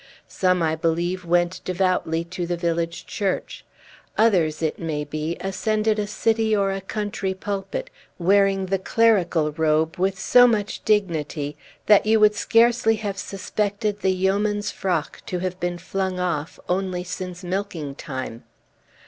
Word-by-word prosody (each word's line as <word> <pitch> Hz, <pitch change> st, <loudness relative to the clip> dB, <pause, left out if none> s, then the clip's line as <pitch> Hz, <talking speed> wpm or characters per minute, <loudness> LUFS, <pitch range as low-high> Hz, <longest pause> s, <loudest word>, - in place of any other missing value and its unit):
Some, 185 Hz, -2 st, +1 dB
I 160 Hz, 0 st, +1 dB
believe, 170 Hz, +3 st, -1 dB
went 175 Hz, +1 st, +1 dB
devoutly 180 Hz, -3 st, 0 dB
to 175 Hz, 0 st, -5 dB
the 175 Hz, 0 st, -1 dB
village 170 Hz, 0 st, -2 dB
church. 195 Hz, -3 st, -3 dB, 0.5 s
Others, 175 Hz, -9 st, +3 dB
it 155 Hz, -, -1 dB
may 155 Hz, -3 st, -2 dB
be, 155 Hz, +3 st, -4 dB
ascended 215 Hz, +3 st, 0 dB
a 205 Hz, -, -1 dB
city 220 Hz, 0 st, +1 dB
or 195 Hz, -1 st, +1 dB
a 195 Hz, 0 st, -3 dB
country 195 Hz, -1 st, -3 dB
pulpit, 205 Hz, -, -4 dB, 0.3 s
wearing 195 Hz, +1 st, +3 dB
the 190 Hz, +1 st, 0 dB
clerical 185 Hz, -7 st, +2 dB
robe 160 Hz, +1 st, +1 dB
with 190 Hz, +2 st, 0 dB
so 245 Hz, +3 st, +6 dB
much 215 Hz, -3 st, -1 dB
dignity 160 Hz, -8 st, 0 dB, 0.3 s
that 210 Hz, 0 st, +5 dB
you 220 Hz, 0 st, +5 dB
would 210 Hz, 0 st, +6 dB
scarcely 230 Hz, +1 st, +3 dB
have 205 Hz, -3 st, -4 dB
suspected 205 Hz, +2 st, -2 dB
the 190 Hz, -, +1 dB
yeoman's 205 Hz, +2 st, 0 dB
frock 175 Hz, -5 st, -2 dB
to 180 Hz, -, -2 dB
have 185 Hz, 0 st, -3 dB
been 175 Hz, 0 st, -2 dB
flung 190 Hz, +1 st, -3 dB
off 170 Hz, -4 st, -2 dB
only 180 Hz, -1 st, -1 dB
since 180 Hz, 0 st, -6 dB
milking 180 Hz, -6 st, -3 dB
time. 130 Hz, -5 st, -6 dB
185 Hz, 145 wpm, -23 LUFS, 170-205 Hz, 0.5 s, so